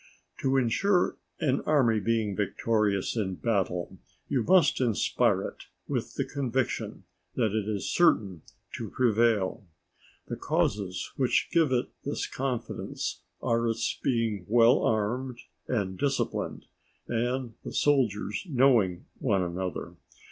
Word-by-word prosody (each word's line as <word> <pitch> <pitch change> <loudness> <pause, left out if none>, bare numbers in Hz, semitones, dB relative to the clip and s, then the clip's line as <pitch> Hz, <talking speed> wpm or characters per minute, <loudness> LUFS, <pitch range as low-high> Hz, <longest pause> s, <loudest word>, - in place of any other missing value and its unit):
_ - - -8
To 135 0 +2
insure 175 - +2 0.2
an 135 -2 +1
army 130 -8 +4
being 110 -1 0
victorious 105 0 0
in 95 -5 -1
battle 95 -5 -1 0.3
you 130 - +1
must 170 -1 +4
inspire 115 -5 +2
it - - -7 0.2
with - - -3
the - - -1
conviction 125 -6 -2 0.3
that 110 -4 +1
it 110 -1 -1
is 105 -2 -2
certain 100 - +3 0.4
to - - -5
prevail. 115 -3 +2 0.6
The - - -4
causes 95 -3 -1
which 130 -3 +2
give 160 -5 +3
it 125 0 +1
this 145 - -2
confidence 130 -3 -4 0.2
are 115 0 +1
its 115 +1 -1
being 115 -7 0
well 115 +1 +5
armed 120 +4 0 0.3
and 95 -6 -2
disciplined, 140 -1 -1 0.4
and 120 +1 -1
the - - -6
soldiers 110 -8 +1
knowing 120 - +3
one 100 -7 +1
another. 90 0 -4
115 Hz, 125 wpm, -28 LUFS, 100-130 Hz, 0.6 s, well